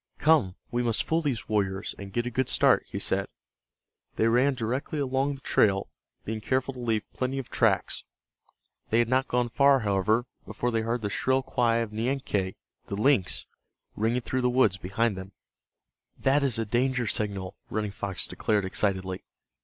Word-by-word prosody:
"Come, 150 - +3 0.2
we 120 +1 0
must 115 -2 +2
fool 160 +1 +1
those 135 -8 -2
warriors, 95 -3 -1
and 100 -1 -8
get 120 +4 -1
a 125 - -3
good 130 +2 0
start," - - +4
he - - -5
said. - - 0 0.9
They 110 - +2
ran 125 +4 +3
directly 125 +5 -2
along 135 0 0
the 135 - -14
trail, 95 -6 +2 0.3
being 110 0 -3
careful 130 +3 0
to 125 - -10
leave 115 -3 0
plenty 130 +1 -2
of 135 - -5
tracks. - - +1 0.9
They 115 - +2
had 120 -1 +3
not 130 +1 +2
gone 125 0 +1
far, 140 +1 +4
however, 105 +3 +1 0.2
before 120 - -2
they 115 -1 +1
heard 115 +1 -2
the 105 - -1
shrill 130 +7 +1
cry 120 -3 +1
of 115 -2 -1
Nianque, 110 -5 -1 0.3
the 100 - -3
lynx, 105 -5 +2 0.5
ringing 115 +4 +1
through 130 +2 -2
the 125 - +2
woods 120 -7 +3
behind 100 +4 0
them. 95 +1 -8 0.8
"That 135 +2 +3
is 135 -4 +2
a 115 - -1
danger 125 +3 +1
signal," 100 -3 -2
Running 105 -1 -2
Fox 100 -1 -4
declared, 105 -3 0
excitedly. 95 -1 -1
115 Hz, 175 wpm, -27 LUFS, 100-130 Hz, 0.9 s, start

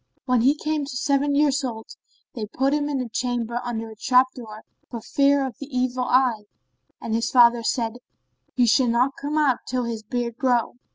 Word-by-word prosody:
When 250 -3 +2
he 270 +5 +4
came 305 0 -2
to 265 -2 -6
seven 280 +1 +1
years 285 -1 +2
old, 225 -4 -6 0.4
they 220 -4 -5
put 270 +5 0
him 295 0 0
in 280 -2 -1
a 250 - -4
chamber 240 0 -2
under 225 -2 -5
a - - -11
trap 250 +3 +4
door, 220 -3 -10 0.3
for 235 - -6
fear 280 +4 +2
of 260 - -7
the 280 - -7
evil 255 -2 -1
eye, 245 -5 +2 0.5
and 220 - -5
his 230 +1 0
father 240 -1 +5
said, 230 0 -2 0.6
"He 245 - +3
shall 245 +2 +3
not 240 +3 +2
come 295 +2 -4
out, 285 -5 +2
till 255 0 -1
his 230 -2 -4
beard 235 +1 -4
grow." 245 -2 0
250 Hz, 195 wpm, -23 LUFS, 235-275 Hz, 0.6 s, father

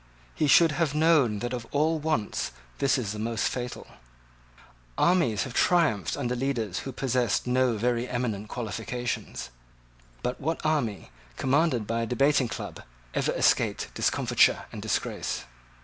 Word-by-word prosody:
He 155 - +1
should 165 +3 +6
have 150 -1 0
known 150 -9 +4
that 120 - -3
of 120 -2 -5
all 155 +2 +1
wants 150 -9 -1 0.3
this 140 -1 +3
is 110 -6 -2
the 105 - -5
most 115 0 0
fatal. 125 -1 -4 1.1
Armies 170 - +3
have 130 - -7
triumphed 150 - +2
under 125 -3 -1
leaders 120 -7 -1
who 135 - -6
possessed 125 -3 0
no 125 -2 +2
very 120 +2 0
eminent 110 -4 -2
qualifications. 115 - -4 0.7
But 125 - -2
what 160 +3 -2
army 120 - -1 0.3
commanded 135 -4 +2
by 115 +2 -1
a 115 - -2
debating 135 +2 +3
club - - -6 0.3
ever - - +1
escaped - - +2
discomfiture - - +2
and - - -7
disgrace? - - -2
125 Hz, 140 wpm, -27 LUFS, 115-145 Hz, 1.1 s, should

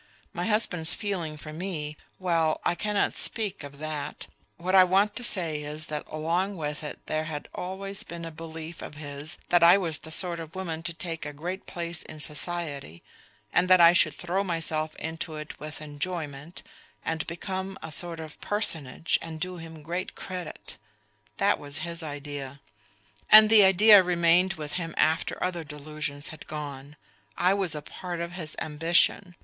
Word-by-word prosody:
My - - -2
husband's 190 -7 +5
feeling 175 -7 -3
for 155 +1 -9
me... 155 -3 -4 0.2
well, 165 -4 +1
I - - +3
cannot 210 +3 0
speak 205 -7 0
of 140 0 -9
that... 155 -1 -5 0.3
what 180 +2 -2
I 190 -1 +9
want 195 +3 +3
to 245 - -4
say 165 -9 0
is 150 +1 -5
that 150 - -2
along 175 +6 -1
with 150 -1 -4
it 150 - -7
there 155 0 -1
had 150 -2 -5
always 195 +2 -4
been 170 0 -7
a 165 - -6
belief 160 +1 -8
of - - -8
his 145 +2 -7
that 175 - +5
I 170 +3 +8
was 165 -6 -1
the 160 - -10
sort 170 +1 -1
of 165 +1 -8
woman 165 -4 -4
to 170 0 -2
take 165 -1 -4
a 150 - -4
great 175 +6 -5
place 170 -2 -1
in 155 - -9
society, 150 - -2 0.5
and 175 +1 +4
that 185 -1 +8
I 170 0 +9
should 180 - +4
throw 180 +3 -1
myself 160 -3 -1
into 160 0 -5
it 155 0 -8
with 155 +1 -7
enjoyment 150 0 -5 0.4
and 160 0 -2
become 190 +3 -4
a 160 - -6
sort 170 +2 -1
of 160 -1 -9
personage 165 - 0
and 160 -1 -7
do 180 +2 -3
him 165 -2 -10
great 175 +4 -4
credit 180 -4 -7 0.6
that - - +3
was 145 0 -6
his 170 0 -5
idea; 145 -2 -6 0.7
and 215 0 +10
the 215 -2 +9
idea 200 +2 +8
remained 180 +1 +3
with 150 -2 -6
him 165 -1 -5
after 160 +2 +2
other 175 -2 -1
delusions 150 -1 -5
had 160 - -10
gone. 145 -2 -6 0.4
I 185 +2 +4
was 190 -6 0
a 150 - -5
part 175 +2 -6
of 170 0 -3
his 170 -4 -6
ambition. 170 +4 +2
165 Hz, 175 wpm, -27 LUFS, 155-180 Hz, 0.7 s, and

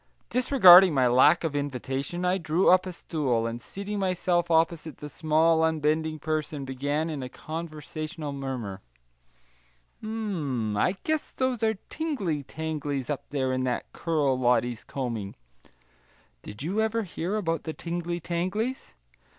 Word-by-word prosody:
Disregarding 190 - +8
my 130 -2 +4
lack 130 +8 +5
of 160 -3 -2
invitation, 140 +4 -3
I 185 +1 +2
drew 165 +3 +3
up 185 0 +4
a - - -3
stool, 135 -9 -1
and 115 +1 -4
seating 200 +1 -5
myself 180 -2 +1
opposite 160 -1 +1
the 150 - -8
small 160 +2 +2
unbending 155 0 +1
person, 155 -2 -3
began 145 +4 -1
in 155 -4 -4
a 125 - -5
conversational 155 0 -6
murmur: 130 -8 -5 1.2
"M 175 - -2
m, - - -2
I 180 - +2
guess 315 -1 -1
those 260 -3 -1
are 220 -1 +2 0.2
tingly 245 - -2
tanglies 145 -2 -4
up 145 - -5
there 130 -2 -1
in 130 0 0
that 125 - -3
curl 145 -6 0
Lottie's 120 -2 +1
combing; 115 -7 -4 1.1
did 105 - -8
you 195 +7 0
ever 220 +1 0
hear 180 +1 -3
about 165 -6 -1
the 160 - -3
tingly 175 +1 -4
tanglies? 185 - -3
160 Hz, 140 wpm, -27 LUFS, 135-180 Hz, 1.2 s, Disregarding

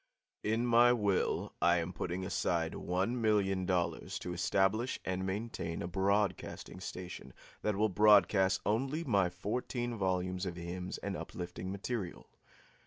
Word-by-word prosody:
In 110 +3 +1
my 120 0 +6
will 100 -5 0
I 85 0 +5
am 85 +1 -2
putting 90 +2 -3
aside 85 -3 0
one 95 +7 -1
million 95 -4 +2
dollars 90 -2 -1
to 90 - -5
establish 95 +7 +1
and 95 0 -1
maintain 95 -4 -3
a - - -3
broadcasting 95 0 -1
station 90 -1 -7 0.3
that 105 -1 0
will 105 +2 +3
broadcast 95 -2 +5
only 135 +9 0
my 100 - +2
fourteen 120 +6 -3
volumes 95 -1 -1
of 90 - -4
hymns 90 +1 -5
and - - -2
uplifting 90 +1 -6
material. 100 -1 -4
95 Hz, 135 wpm, -33 LUFS, 90-110 Hz, 0.3 s, my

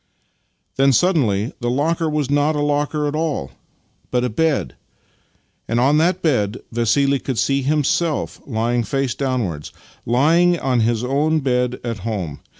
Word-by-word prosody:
Then 135 0 +4
suddenly 125 - +1
the 120 -1 -2
locker 160 +5 0
was 150 -3 -1
not 145 +2 +2
a - - -1
locker 145 +1 0
at 145 - -3
all, 155 - -2 0.6
but 125 -1 0
a 125 - 0
bed, 145 - 0 0.9
and 115 +1 0
on 140 +5 +3
that 180 +3 +1
bed 120 -8 +1
Vassili 135 +4 +2
could 130 -2 -4
see 140 +3 +1
himself 155 +3 0
lying, 120 0 0
face 135 +3 -1
downwards 120 - -3 0.2
— - - -33
lying 165 +9 +3
on 130 -5 0
his 115 0 +1
own 150 +5 +1
bed 125 -2 0
at 115 -3 -4
home. 95 -8 -4
135 Hz, 155 wpm, -20 LUFS, 120-150 Hz, 0.9 s, Then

